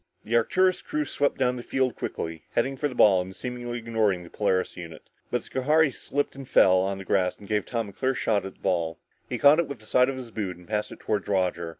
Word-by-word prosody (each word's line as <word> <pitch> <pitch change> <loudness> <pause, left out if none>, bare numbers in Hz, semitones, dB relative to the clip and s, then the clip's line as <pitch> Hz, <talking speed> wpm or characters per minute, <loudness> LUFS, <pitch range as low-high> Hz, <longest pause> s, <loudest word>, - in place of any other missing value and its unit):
The 115 +2 -1
Arcturus 185 +10 +3
crew 305 0 -2
swept 145 - 0
down 125 -1 +1
the - - -5
field 130 0 0
quickly, 80 -1 -5
heading 135 +1 +1
for 145 +3 -1
the 130 - -8
ball 95 -5 +6
and 95 +1 -8
seemingly 120 -1 -5
ignoring 110 -6 0
the 85 - -13
Polaris 95 -3 0
unit. 85 -3 -10 0.2
But 125 - -1
Schohari 150 +3 +2
slipped 145 +3 -3
and 135 -2 -9
fell 95 0 +6
on 95 +1 -1
the 95 - -8
grass 90 -1 +1
which 100 - -12
gave 105 -1 0
Tom 115 -4 -2
a - - -13
clear 130 +5 0
shot 105 -5 +1
at 95 0 -8
the - - -31
ball. 85 -4 0 0.3
He - - -2
caught 145 +3 +6
it 170 - +1
with 140 - -6
the 110 - -17
side 125 +4 +3
of 135 - -4
his 125 -3 -8
boot 100 -5 -4
and 90 - -17
passed 105 -1 -2
it - - -11
toward 105 -2 -1
Roger. 90 -4 0
110 Hz, 250 wpm, -26 LUFS, 95-130 Hz, 0.3 s, ball